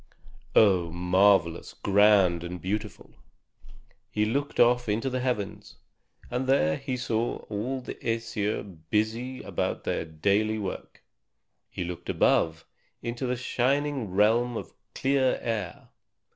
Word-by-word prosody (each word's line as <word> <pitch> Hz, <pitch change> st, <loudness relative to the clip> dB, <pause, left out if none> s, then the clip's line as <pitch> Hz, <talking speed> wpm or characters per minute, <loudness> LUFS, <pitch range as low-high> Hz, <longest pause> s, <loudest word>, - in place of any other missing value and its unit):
Oh, 95 Hz, -5 st, +5 dB
marvelous, 90 Hz, 0 st, +2 dB
grand, 100 Hz, -4 st, +4 dB
and 90 Hz, +1 st, -6 dB
beautiful! 105 Hz, +5 st, -4 dB, 1.0 s
He 105 Hz, 0 st, 0 dB
looked 140 Hz, +6 st, -2 dB
off 120 Hz, -1 st, +4 dB
into 115 Hz, +6 st, 0 dB
the 130 Hz, -, -1 dB
heavens, 125 Hz, -6 st, -3 dB, 0.6 s
and 125 Hz, +2 st, -1 dB
there 80 Hz, -, +3 dB
he 130 Hz, -1 st, -4 dB
saw 115 Hz, -1 st, -1 dB
all 125 Hz, +6 st, -2 dB
the -, -, -6 dB
Æsir 110 Hz, -5 st, -3 dB
busy 115 Hz, +4 st, -1 dB
about -, -, -2 dB
their -, -, -1 dB
daily 100 Hz, +7 st, 0 dB
work. 100 Hz, -3 st, -6 dB, 0.7 s
He -, -, -4 dB
looked 85 Hz, 0 st, -7 dB
above, 80 Hz, 0 st, +2 dB, 0.4 s
into 120 Hz, +2 st, -3 dB
the 125 Hz, -, 0 dB
shining 135 Hz, 0 st, 0 dB
realm 115 Hz, +5 st, +2 dB
of -, -, -7 dB, 0.2 s
clear 135 Hz, -1 st, +2 dB
air. 105 Hz, -7 st, -4 dB
110 Hz, 120 wpm, -27 LUFS, 95-125 Hz, 1.0 s, Oh